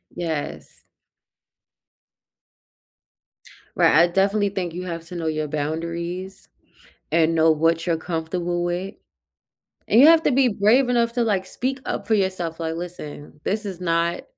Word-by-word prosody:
Yes. 160 -4 -5 2.9
Right, - - +4
I 170 +3 +6
definitely 200 +3 +1
think 185 -4 -4
you 180 +2 -5
have 165 -1 -6
to 180 - -9
know 165 -2 -3
your 155 -1 -1
boundaries, 170 +5 -4 0.6
and 165 0 +3
know 160 0 +5
what 165 +2 +1
you're 165 -1 +1
comfortable 175 +1 -3
with, 180 +3 -3 0.9
and 225 - +4
you 285 - +9
have 325 0 +6
to - - +2
be 265 0 +4
brave 230 +5 +3
enough 235 -1 +1
to, 240 -1 +1
like, 195 -4 0
speak 265 +6 -3
up - - -3
for 225 - +2
yourself, 185 -5 -1
like, 165 0 -3
"Listen, 150 -4 -8
this 210 +2 -2
is 190 -3 -6
not 170 0 0
175 Hz, 145 wpm, -23 LUFS, 165-200 Hz, 2.9 s, you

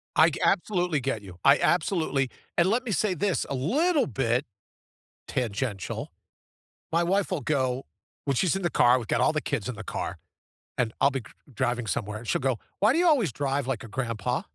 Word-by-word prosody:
I 160 +1 +7
ge - - -6
I - - +6
absolutely 180 -5 +1
get 125 -5 -2
you 95 -3 -11
I 140 +1 +7
absolutely 155 -6 +1 0.3
and 175 +2 +4
let 240 +5 +1
me 230 - -4
say 200 0 +1
this 185 +3 0
a 140 - -2
little 285 - +2
bit 125 +2 0 0.8
tangential, 110 -4 -3 0.8
my 170 +1 +3
wife 195 +3 +1
will 170 -6 -1
go 130 -2 0 0.4
when 140 -2 +1
she's 185 +6 +2
in 195 - -2
the 175 - +1
car, 125 -5 +5
we've 120 -3 -5
got - - +1
all 155 - +3
the 155 - 0
kids 130 -6 -2
in 125 - -4
the - - -7
car, - - -4 0.6
and 115 -3 0
I'll 140 - +5
be 135 - -2
c 110 - -16 0.2
driving 120 0 -1
somewhere 105 +1 -2
and 115 - -11
she'll - - 0
go, 130 -4 +1 0.2
"Why 210 +6 +4
do 330 - +2
you 355 - +4
always 250 - +3
drive 140 0 -1
like 130 -3 -2
a - - -8
grandpa?" 125 - -2
140 Hz, 210 wpm, -27 LUFS, 120-180 Hz, 0.8 s, I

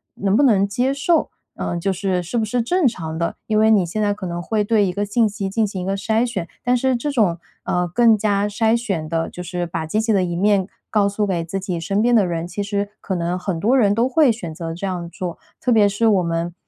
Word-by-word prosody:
能 195 0 0
不 235 - +4
能 200 -7 +4
接 245 +6 0
受 315 +4 +1 0.3
呃， 175 - -3
就 195 +3 -1
是 190 -1 -1
是 185 +8 -3
不 225 - +1
是 240 +3 0
正 350 +6 +2
常 160 -8 -4
的？ 170 0 -2
因 215 -1 +1
为 220 0 +5
你 205 -5 +4
现 195 +6 -3
在 205 -1 +2
可 200 -2 -7
能 175 -1 -4
会 210 +4 0
对 210 -1 +2
一 180 - -2
个 205 +2 -1
信 220 +3 +2
息 205 -2 -4
进 215 +2 +1
行 195 -2 -5
一 - - -4
个 195 +1 -1
筛 220 +4 +1
选， 195 -8 -4 0.2
但 250 0 +2
是 260 +1 +1
这 265 +5 -2
种， 210 -11 +2 0.3
呃， 180 0 0
更 225 +5 +4
加 205 -1 +1
筛 220 +2 +2
选 195 -10 -3
地 165 0 -1
就 180 - -8
是 180 0 -3
把 160 -1 -4
积 185 +7 -1
极 220 0 +1
的 195 -2 +3
一 175 -1 -2
面 200 0 +2 0.2
告 205 -2 +2
诉 205 +1 -1
给 175 -3 -1
自 175 +4 -4
己 185 -2 -3
身 195 +5 -1
边 240 +1 +3
的 210 -4 +4
人， 170 -1 -3
其 185 +3 -4
实 200 0 -2
可 190 - -3
能 175 +1 -1
很 180 -2 -3
多 235 +9 +3
人 205 -5 +4
都 230 +4 +2
会 270 0 +4
选 180 -8 -6
择 165 0 -5
这 180 +4 -4
样 175 -2 -4
做， 175 0 -5 0.2
特 - - -2
别 210 -2 +5
是 205 +3 +1
我 200 -4 +3
们， 170 0 -2
200 Hz, 285 characters per minute, -21 LUFS, 180-220 Hz, 0.3 s, 为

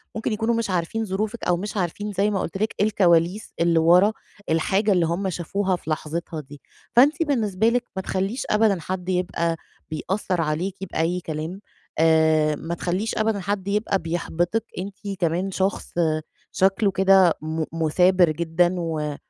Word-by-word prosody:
ممكن 220 0 -2
يكونوا 225 +2 0
مش 230 -2 -1
عارفين 185 +5 -1
ظروفِك 215 +4 -3
أو 175 - +2
مش 205 +4 -5
عارفين 205 +3 -2
زي 200 +2 +2
ما 195 - 0
قُلت 180 - -4
لِك 215 +3 -1
الكواليس 185 -1 +2
اللي 170 -1 +3
ورا 180 +6 +5 0.4
الحاجة 195 +6 +2
اللي 180 -3 +3
هُم 175 +4 -1
شافوها 185 +3 -1
في 170 - -9
لحظتها 160 +1 -3
دي، 145 0 -14 0.3
فأنتِ 290 +7 +5
بالنسبة 225 - +1
لِك 245 +1 +1
ما 190 - -2
تخلّيش 195 +6 -2
أبدًا 210 -3 +3
حد 180 +2 -4
يبقى 175 -2 0 0.3
بيأثّر 180 +3 -2
عليكِ 165 +5 -2 0.2
بأي 165 +3 0
كلام، 160 +2 -5 0.4
آآ، 160 -1 +4
ما 165 +3 -5
تخلّيش 185 +6 -2
أبدًا 215 -1 +1
حد 195 0 -3
يبقى 200 -1 0
بيحبطِك. 175 +5 -2
أنتِ 195 +2 -5 0.2
كمان 175 +2 0
شخص 190 +1 -2 0.6
شكله 195 +2 +2
كده 190 -2 +5
م 160 +1 -2
مُثابر 175 +2 +3
جدًا 170 +2 +1
و 155 -3 -2
185 Hz, 155 wpm, -23 LUFS, 165-205 Hz, 0.6 s, ورا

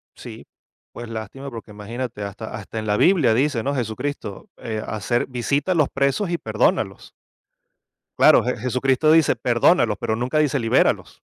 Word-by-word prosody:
Sí, - - -11 0.5
pues, 120 -1 -9
lástima, 115 +5 -7
porque 115 -4 -10
imagínate 110 +2 -6
hasta 100 +2 -7
hasta 105 +2 -6
en 110 - -5
la 105 0 +1
Biblia 160 - +4
dice, 130 -1 +1
¿no?: 140 - -1
"Jesucristo, 130 - -4
eh, 110 -2 -4
hacer 110 +3 -1
visita 140 +6 -1
a - - +2
los 150 -4 +2
presos 140 +8 0
y 170 - 0
perdónalos". 110 - -1 1.0
Claro. - - +6
Je - - -1
Jesucristo 130 +5 +1
dice: 160 -2 +4
"Perdónalos", - - +2
pero 110 - -1
nunca 125 +6 -1
dice 145 -2 +1
libéralos 115 -2 +1
125 Hz, 160 wpm, -22 LUFS, 110-140 Hz, 1.0 s, Claro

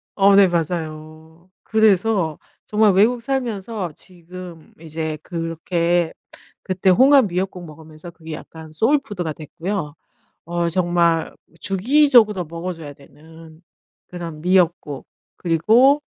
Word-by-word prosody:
어 200 0 +5
네 200 -1 +7
맞아요. 160 0 -5
그래서 205 -6 +2 0.3
정말 210 -2 +3
외국 230 +5 +3
살면서 225 - -3
지금 175 -2 -12
이제 160 -1 -5
그렇게 170 0 -1 0.5
그때 190 0 0
홍합 260 +5 +5
미역국 180 0 -4
먹으면서 155 +1 -12
그게 160 -1 -10
약간 160 +1 -10
소울 230 - +2
푸드가 180 - -5
됐고요. 165 +1 -5 0.5
어 170 0 -1
정말 170 -2 +1 0.3
주기적으로 220 - +3
먹어 170 +3 -6
줘야 150 -3 -9
되는 160 +4 -17 0.5
그런 170 -3 -8
미역국 175 -6 +1 0.3
그리고 230 - +3
175 Hz, 250 characters per minute, -20 LUFS, 160-200 Hz, 0.5 s, 네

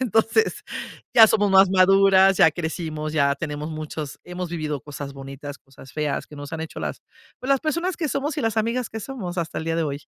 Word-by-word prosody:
Entonces 235 - +1 0.5
ya 225 -2 +10
somos 205 -1 +2
más 190 0 +7
maduras, 195 0 +5
ya 160 - +7
crecimos, 160 -2 -4
ya 140 -2 +3
tenemos 150 0 -4
muchos 155 -1 -6
hemos 180 0 -5
vivido 155 -4 -3
cosas 145 0 -7
bonitas, 140 +1 -8
cosas 135 0 -16
feas 150 -2 -2
que 150 - -12
nos 145 0 -8
han 165 - -4
hecho 160 - -7
las - - -4 0.4
pues, 255 - -6
las 275 - +5
personas 335 +3 -1
que 315 -3 -2
somos 280 +2 -2
y - - -1
las 225 -1 0
amigas 230 +3 0
que 220 - -5
somos 200 -9 -6
hasta 165 -1 -3
el - - -5
día 165 0 -1
de 165 - +1
hoy. 145 -1 -4
170 Hz, 215 wpm, -23 LUFS, 150-220 Hz, 0.5 s, ya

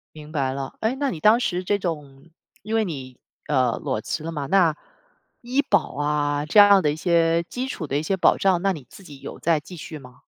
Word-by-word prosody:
明 150 0 -11
白 135 -4 -1
了。 135 0 -5
诶 225 +4 0
那 280 0 -1
你 165 - -5
当 215 +7 +5
时 180 -6 -1
这 200 +2 0
种 150 -4 -6 0.3
因 215 +2 -3
为 225 - +3
你， 130 -7 -7 0.3
呃， 130 -5 +1
裸 105 - -2
辞 155 - -4
了 165 - -4
嘛， 145 -3 -4
那 175 -4 +3 0.7
医 255 +4 0
保 190 - 0
啊 145 0 0
这 205 +7 +4
样 200 -1 +8
的 150 - +1
一 150 - -3
些 170 0 +2
基 250 +8 -5
础 160 - -5
的 135 - -1
一 150 - -2
些 190 +4 -1
保 - - +4
障， 185 -3 +2
那 195 0 +2
你 145 -6 -9
自 195 - -14
己 145 -5 -12
有 - - -8
在 165 -2 +2
继 180 +5 -12
续 160 -1 -8
吗？ 125 -3 -15
165 Hz, 250 characters per minute, -23 LUFS, 145-195 Hz, 0.7 s, 样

